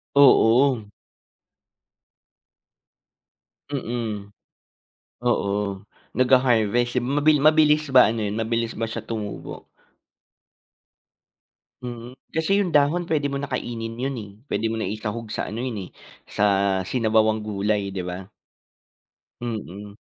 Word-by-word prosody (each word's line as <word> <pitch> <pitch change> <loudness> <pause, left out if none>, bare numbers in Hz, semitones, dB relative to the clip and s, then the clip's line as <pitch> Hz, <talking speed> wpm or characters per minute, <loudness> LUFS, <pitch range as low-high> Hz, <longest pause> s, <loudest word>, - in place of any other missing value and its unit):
Oo. 130 -3 +5 2.8
Mm, 115 -6 -4 0.9
oo 120 -5 +1 0.6
nagha-harvest, 120 -2 +2
eh 120 - -5
mabi 150 0 +4
mabilis 155 0 +4
ba 125 -3 +8
ano 115 - -3
'yun 105 +1 -3
mabilis 115 0 -1
ba 115 - -4
siya - - -4
tumubo? 105 -3 -6 2.2
Mm, 120 +1 -8 0.2
kasi 160 +5 +1
'yung 190 -5 0
dahon 150 +5 +3
pwede 150 -4 0
mo 140 - -3
na 140 - -3
kainin 115 -4 -4
yun 135 0 -2
eh, 105 -3 -8 0.2
pwede 115 - -1
mo 110 0 -1
na 95 - -2
isahog 110 +2 -5
sa - - -3
ano 110 +3 -5
yun 125 -4 -3
eh - - -13 0.4
sa 105 - 0 0.4
sinabawang 110 0 +1
gulay 100 -1 -1
'di 95 - -3
ba? 90 +2 -7 1.1
Mm. 105 -3 -6
115 Hz, 115 wpm, -23 LUFS, 105-135 Hz, 2.8 s, ba